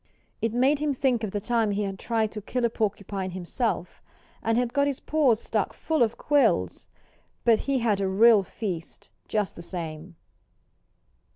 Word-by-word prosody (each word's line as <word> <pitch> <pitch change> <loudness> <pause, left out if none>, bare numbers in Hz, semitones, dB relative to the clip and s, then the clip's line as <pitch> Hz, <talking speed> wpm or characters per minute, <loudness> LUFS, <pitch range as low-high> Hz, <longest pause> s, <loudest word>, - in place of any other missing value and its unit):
It 225 - 0
made 265 +5 +3
him 295 -2 0
think 255 -3 +1
of 215 - -1
the 205 - -2
time 230 0 +1
he 205 +1 0
had 195 -1 -4
tried 225 -2 0
to 210 - -6
kill 245 +4 -1
a 235 - +1
porcupine 200 -3 -2
himself, 185 +2 -3 0.4
and 225 +1 +1
had 245 -1 0
got 280 0 +2
his 280 -2 -2
paws 280 -8 +2
stuck - - -1
full 320 -3 -1
of 230 -1 +2
quills. 240 - +1 0.6
But 225 -2 +5
he 275 - +3
had 220 -5 +1
a 195 - +1
real 215 +3 +6
feast, 185 -4 -6 0.2
just 210 -4 -1
the - - -9
same. 170 -1 -6
220 Hz, 175 wpm, -26 LUFS, 195-245 Hz, 0.6 s, real